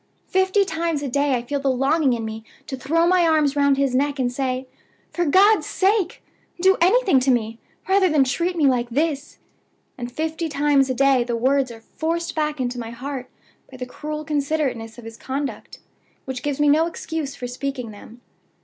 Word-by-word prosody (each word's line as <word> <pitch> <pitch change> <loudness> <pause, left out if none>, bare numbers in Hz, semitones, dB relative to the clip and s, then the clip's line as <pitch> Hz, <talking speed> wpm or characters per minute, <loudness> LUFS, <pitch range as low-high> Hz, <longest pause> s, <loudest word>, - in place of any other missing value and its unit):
Fifty 380 +2 +2
times 325 -3 -2
a - - -2
day 280 +1 +1
I 240 - -2
feel 285 +3 -2
the 275 0 0
longing 270 +2 +2
in 230 -2 -3
me 220 0 -6 0.2
to 275 - -5
throw 320 +6 +1
my 355 -1 +4
arms 305 -3 +2
round 280 -1 +3
his 275 -2 +1
neck, 285 +2 +1
and 250 -2 0
say: 255 0 -2 0.5
'For 345 - 0
God's 400 +8 +4
sake, 385 -1 0 0.4
do 380 +2 +5
anything 380 - +4
to 260 +1 0
me, 225 -2 0 0.3
rather 380 -1 +4
than 300 -3 +4
treat 340 +7 -1
me 315 -4 +2
like 250 -3 +2
this!' 290 +2 -2 0.6
and 240 0 -5
fifty 320 +3 -3
times 285 -2 +2
a 260 - 0
day 270 -1 +4
the 240 -1 -2
words 265 +2 +2
are 230 -1 -11
forced 335 +7 -3
back 300 -2 -1
into 250 -1 -2
my 230 -1 -5
heart 255 +2 -6 0.4
by 260 - -12
the 250 - -5
cruel 305 +4 -6
considerateness 280 -6 -2
of 240 - -11
his 225 0 -9
conduct; 275 +3 -5 0.5
which 260 -1 -5
gives 290 -1 -2
me 295 - +3
no 310 +3 +4
excuse 320 -4 -5
for 250 - -6
speaking 250 -1 -4
them. 220 +3 -14
280 Hz, 195 wpm, -22 LUFS, 255-320 Hz, 0.6 s, do